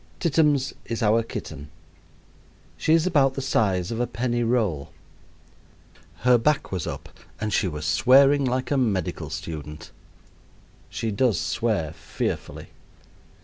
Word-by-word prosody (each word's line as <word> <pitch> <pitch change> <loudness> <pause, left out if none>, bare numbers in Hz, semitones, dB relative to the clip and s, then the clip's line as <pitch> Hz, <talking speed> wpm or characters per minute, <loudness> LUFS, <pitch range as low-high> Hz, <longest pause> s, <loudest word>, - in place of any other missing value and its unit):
Tittums 150 -5 +2
is 115 -1 -3
our 110 +2 +4
kitten. 75 -9 -7 1.1
She 160 - +3
is 165 0 +2
about 140 -7 +3
the - - -3
size 95 -8 +1
of 115 - -3
a 120 - 0
penny 120 0 -1
roll. 110 - 0 1.3
Her 125 -1 +6
back 150 +4 +1
was 90 -4 -3
up - - -6 0.3
and 105 -1 -2
she 95 - +2
was 75 -3 -5
swearing 140 +2 +5
like 130 +1 -1
a 140 - +2
medical 105 -9 -1
student. 75 -1 -7 1.0
She 115 - -3
does 110 +1 +1
swear - - -1
fearfully. - - -5
120 Hz, 130 wpm, -24 LUFS, 95-135 Hz, 1.3 s, Her